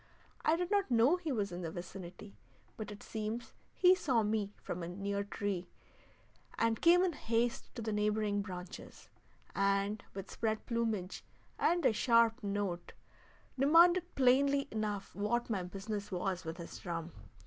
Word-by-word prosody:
I 315 - +4
did 355 +2 -2
not 405 -5 +2
know 245 +8 +4
he 335 -4 -4
was 205 -6 -1
in 175 +1 -5
the 165 - -3
vicinity, 180 +3 -8 0.4
but 215 - -6
it 210 0 -9
seems 220 +2 -4 0.2
he 365 0 +6
saw 260 - +1
me 210 -1 0
from 175 - -4
a 170 - -4
near 200 +3 -2
tree, 200 -3 -3 0.9
and 230 0 +1
came 350 +2 +6
in 365 -2 +1
haste 235 -3 -1
to 235 - -5
the 220 -1 -2
neighboring 210 0 +1
branches, 180 -1 -9 0.5
and 200 +1 +1
with 195 0 -6
spread 220 -1 -2
plumage 225 -6 -2 0.4
and 345 0 +2
a - - +5
sharp 230 +1 +4
note 200 -4 -3 0.7
demanded 345 +5 +5
plainly 275 +2 +4
enough 210 -2 -3
what 235 +4 -1
my 200 -4 0
business 200 +3 -5
was 185 0 -2
with 165 +1 -5
his 170 -2 -8
drum. 170 -2 -4
215 Hz, 155 wpm, -34 LUFS, 195-240 Hz, 0.9 s, he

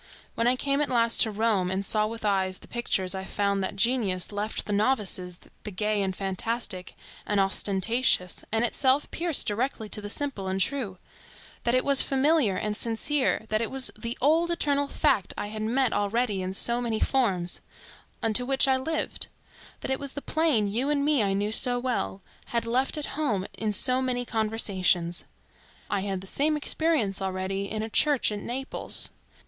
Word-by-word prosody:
When 230 - 0
I 250 - +4
came 275 +2 0
at 295 - 0
last 230 -2 +3
to 225 - +4
Rome 210 -3 +1
and 190 +1 -2
saw 215 +1 +1
with 225 0 -7
eyes 190 -2 +1
the - - -16
pictures, 195 -6 -1
I 190 0 -4
found 200 0 -1
that 190 - -3
genius 200 -5 +1
left 210 +1 -3
to 210 - -2
novices 200 -5 0 0.3
the - - -5
gay 210 +1 -1
and 190 -1 -2
fantastic 195 0 -3 0.3
and 205 -1 +1
ostentatious, 195 +1 +1
and 225 +2 +2
itself 265 +3 +1
pierced 335 -3 +2
directly 220 +1 -2
to 210 - 0
the 205 - -6
simple 245 -6 -3
and 190 0 -1
true; 205 -3 -1 0.7
that 235 +1 +2
it 255 - +1
was 280 -1 +7
familiar 270 - +2
and 210 +1 -2
sincere; 235 +3 0
that 215 +1 +1
it 230 - -1
was 265 -1 +2
the 235 +1 -5
old, 320 +5 +3
eternal 285 -4 +1
fact 275 - +1
I 205 - -3
had 215 0 -5
met 245 +3 +1
already 205 -1 0
in 185 +1 -4
so 235 +4 +1
many 230 -2 -1
forms,—unto 220 +1 -1
which 270 +2 +2
I 265 -1 +4
lived; 315 +5 -2 0.5
that - - -3
it 265 - 0
was 280 -1 -6
the 285 - -6
plain 310 -10 +2
you 240 +8 -1
and 285 -1 +1
me 295 -4 +3
I 200 -2 +1
knew 205 +2 -1
so 245 +2 +2
well,—had 235 - -3
left 255 +6 0
at 300 - -2
home 225 -11 -1
in 215 -1 -2
so 255 +5 +3
many 250 -1 -1
conversations. 195 -6 0 0.7
I 205 - +1
had 195 -1 -3
the - - -10
same 300 +9 +1
experience 290 -11 +1
already 190 +1 -3
in 215 0 -3
a - - -3
church 285 0 +3
at 210 - -3
Naples. 265 +5 +1
225 Hz, 180 wpm, -27 LUFS, 195-265 Hz, 0.7 s, was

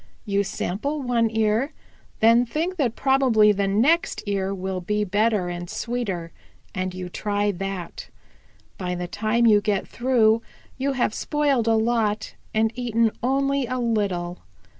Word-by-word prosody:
You 200 -1 +1
sample 275 +11 -3
one 235 -2 +2
ear, 220 +6 +1 0.5
then 230 +2 +6
think 325 +9 -2
that 250 -7 0
probably 260 -6 +4
the 200 -1 0
next 255 +13 +2
ear 195 -2 -1
will 190 -1 -3
be 210 +3 0
better 205 -1 +1
and 175 0 -5
sweeter 200 -9 -3 0.4
and 185 -1 -2
you 185 -1 -5
try 205 +2 -1
that. 195 -2 -6 0.7
By 180 -1 -2
the 175 0 -4
time 220 +5 +1
you 210 -2 +6
get 205 -2 -1
through 230 -3 +2 0.4
you 275 +1 0
have 245 -4 0
spoiled 285 -6 0
a 225 - +4
lot, 220 -2 0 0.2
and 220 0 +1
eaten 230 -2 +1
only 275 +1 +1
a 255 +1 -2
little. 200 -7 -1
220 Hz, 145 wpm, -24 LUFS, 195-245 Hz, 0.7 s, then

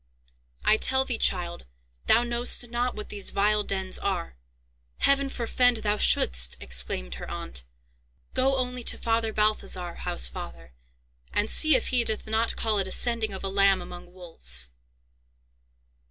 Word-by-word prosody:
"I 215 - +5
tell 265 +3 +2
thee, 245 -4 -3
child, 175 - -1 0.4
thou 240 - +4
knowst 240 0 +1
not 245 +1 -2
what 210 - -8
these 200 -2 -1
vile 210 +1 +1
dens 190 -2 -1
are. 185 - -3 0.6
Heaven 275 0 +2
forfend 245 -1 +1
thou 210 0 0
shouldst!" - - +3
exclaimed - - -3
her - - -7
aunt. 65 -1 -3 0.7
"Go 265 +1 +1
only 250 -1 -3
to - - +1
Father 225 -1 -1
Balthazar, 210 -5 0
housefather, 60 0 -4 0.6
and 205 - 0
see 310 +5 +5
if 255 - 0
he 250 -2 +3
doth 220 -2 -2
not 220 +1 -1
call 215 -2 +1
it 190 - -1
a - - -8
sending 230 -2 0
of 190 - -7
a - - -1
lamb 195 0 +3
among 175 0 -11
wolves." 65 - -1
210 Hz, 150 wpm, -26 LUFS, 175-240 Hz, 0.7 s, I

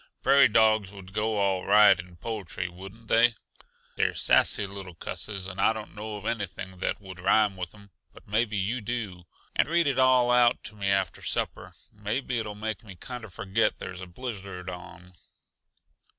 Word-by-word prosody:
(Prairie 140 0 +7
dogs 110 -3 +3
would 95 -2 -12
go 105 +1 0
all 95 -2 +1
right 105 +1 +6
in 90 0 -9
poetry, 95 -2 -4
wouldn't 95 +6 -12
they? 115 +1 +4 0.6
They're - - +1
sassy 100 - +4
little 95 -3 -9
cusses, 100 +3 -4
and 95 0 -4
I 110 - +4
don't 110 -1 -8
know 105 0 -6
of 105 - -11
anything 95 -4 -4
that - - -1
would 95 -2 -11
rhyme 100 +2 +3
with 90 +1 -6
'em, 100 -1 -17 0.2
but - - -17
maybe 110 +1 +1
you 110 +6 -1
do.) 105 -6 -4 0.3
And - - +2
read 170 0 +3
it 135 -2 +1
all 130 -2 +5
out 125 0 +4
to 105 - -7
me 100 -1 -3
after 95 -1 0
supper. - - -2 0.2
Maybe 115 +4 -2
it'll 105 -2 -5
make 110 -1 -4
me 100 -4 -11
kinda 120 +3 -8
forget 95 +4 0
there's 90 0 -7
a 95 - -7
blizzard 95 -3 -6
on." 90 0 -11
105 Hz, 180 wpm, -27 LUFS, 95-115 Hz, 0.6 s, Prairie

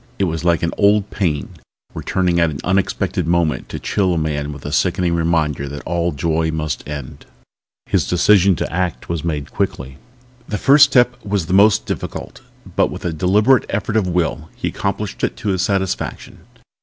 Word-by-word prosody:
It - - 0
was 80 -3 -2
like 85 -1 +2
an 85 - 0
old 105 0 +3
pain 75 -8 -1 0.4
returning 90 -2 0
at 85 -1 +3
an 75 - -5
unexpected 95 -3 0
moment 85 -2 0
to - - -5
chill 95 -3 0
a - - -1
man 75 -2 -2
with 70 -1 -10
the 75 - -5
sickening 90 +2 +1
reminder 80 -4 0
that 75 +1 -7
all 85 +1 0
joy 80 +2 0
must 75 -4 -3
end. 70 -3 -7 0.6
His - - 0
decision 95 +1 +4
to - - -4
act 85 -8 -2
was 85 -3 -2
made 75 -4 -3
quickly. 65 0 -3 0.5
The 105 - -2
first 140 +6 +7
step 125 -3 +2
was 100 -4 -1
the 90 - -3
most 105 +2 +5
difficult - - -6 0.3
but - - +3
with - - -8
a 85 - -1
deliberate 105 - +3
effort 105 +2 -2
of 105 -4 +2
will 85 -3 -1
he - - -3
accomplished - - -4
it - - -1
to 105 - -3
his 95 -2 0
satisfaction. 95 -1 -2
85 Hz, 180 wpm, -19 LUFS, 80-100 Hz, 0.6 s, first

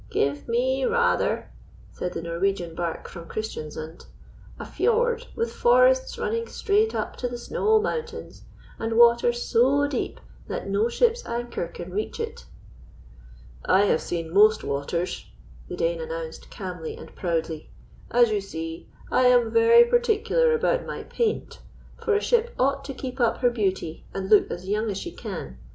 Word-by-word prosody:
"Give 140 +1 -1
me 260 +3 +1
rather," 475 - +1 0.4
said 180 - -4
the 165 - -5
Norwegian 170 0 -1
barque 170 0 -4
from 170 -2 -10
Christiansund, 160 -6 -6 0.5
"a - - -7
fiord 475 +1 +1
with 460 +1 -2
forests - - +4
running 460 0 -2
straight 430 +2 +1
up - - -3
to 250 - -2
the 240 0 -5
snow 435 - +2
mountains, 470 +1 -4 0.4
and 225 0 -2
water 235 0 +6
so 250 +4 +2
deep 285 - -3 0.3
that - - -4
no 200 +4 +1
ship's 475 - +2
anchor 235 -6 -3
can 175 +1 -9
reach 210 +2 -3
it." - - -5 1.2
"I 190 +2 +4
have 160 - +2
seen 165 -1 -4
most 215 +2 +5
waters," 155 +6 -3 0.4
the - - -4
Dane - - -1
announced 485 0 -6
calmly 180 -6 -6
and - - -12
proudly. 165 -3 -2 0.4
"As 240 -2 +4
you 210 -1 0
see, 165 -3 -7 0.2
I 255 - +3
am 245 -2 +4
very 465 +1 +7
particular 475 0 +2
about - - +1
my - - -6
paint, 450 -2 -2 0.4
for 435 - +2
a 415 - +2
ship 475 0 +1
ought 275 +1 +1
to 275 - -6
keep 260 0 -6
up 235 -2 +2
her 245 -1 +4
beauty 190 -7 -2
and 195 +1 -4
look 210 - +6
as 180 +2 -6
young 215 +2 0
as 195 - -3
she 345 - -5
can. 180 - -7
240 Hz, 160 wpm, -25 LUFS, -, 1.2 s, very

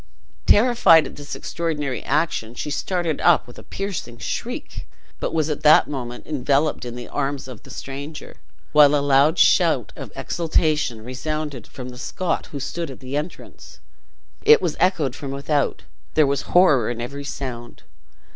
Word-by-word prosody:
Terrified 215 -8 +6
at - - -8
this 145 0 -7
extraordinary 150 -6 -3
action, 140 -6 -1
she 150 - -4
started 170 0 -1
up 175 -3 +4
with 120 - -13
a - - -12
piercing 195 -12 -5
shriek, - - -5 0.3
but - - -2
was 155 -2 0
at 150 -2 -3
that 155 0 +6
moment 125 -4 -6
enveloped 145 0 0
in 120 -1 -6
the 120 0 -7
arms 140 -1 -3
of 125 -4 -10
the - - -16
stranger, 140 +3 -8 0.3
while 150 -1 +6
a 140 -1 +1
loud 145 +4 +4
shout - - +3
of - - -8
exhultation 155 -8 0
resounded 140 +1 -4
from 125 -2 -8
the 125 0 -10
Scot 180 +7 -2
who 145 - -7
stood 165 +4 -4
at 130 - -9
the 130 +1 -6
entrance. 150 +4 -7 0.6
It 450 +2 +7
was - - -2
echoed 155 -9 +1
from 140 - -6
without. 140 +1 -1 0.3
There 155 - +5
was 140 0 -2
horror 150 -11 +5
in 120 -1 -4
every 140 +4 -5
sound. 130 -3 -7
145 Hz, 165 wpm, -22 LUFS, 130-155 Hz, 0.6 s, It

